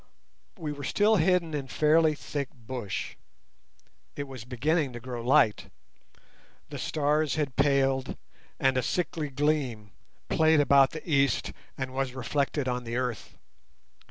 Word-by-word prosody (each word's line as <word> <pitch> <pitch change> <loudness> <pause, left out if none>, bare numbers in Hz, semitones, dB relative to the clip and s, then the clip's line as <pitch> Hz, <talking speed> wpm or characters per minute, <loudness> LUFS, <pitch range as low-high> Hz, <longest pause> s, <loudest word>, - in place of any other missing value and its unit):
We 155 -4 -4
were 145 -1 -8
still 210 +9 +3
hidden 175 -1 +2
in 140 -3 -3
fairly 155 +2 +3
thick 140 -2 -4
bush. 120 -3 -5 1.0
It 145 - -3
was 130 -4 -9
beginning 140 +3 0
to 120 - -6
grow 120 -1 -6
light. 125 -4 +3 1.0
The - - -6
stars 150 0 0
had 145 -5 -2
paled 135 -2 +1 0.4
and 135 -1 +2
a - - +3
sickly 160 +1 -2
gleam 135 -7 -1 0.4
played 160 -1 +4
about 140 -1 +5
the 155 - -9
east 140 -3 +1 0.2
and 130 -1 -4
was 135 -1 -2
reflected 140 +2 -1
on 125 0 -2
the 115 0 -5
earth. 125 -3 -4
140 Hz, 135 wpm, -28 LUFS, 130-150 Hz, 1.0 s, about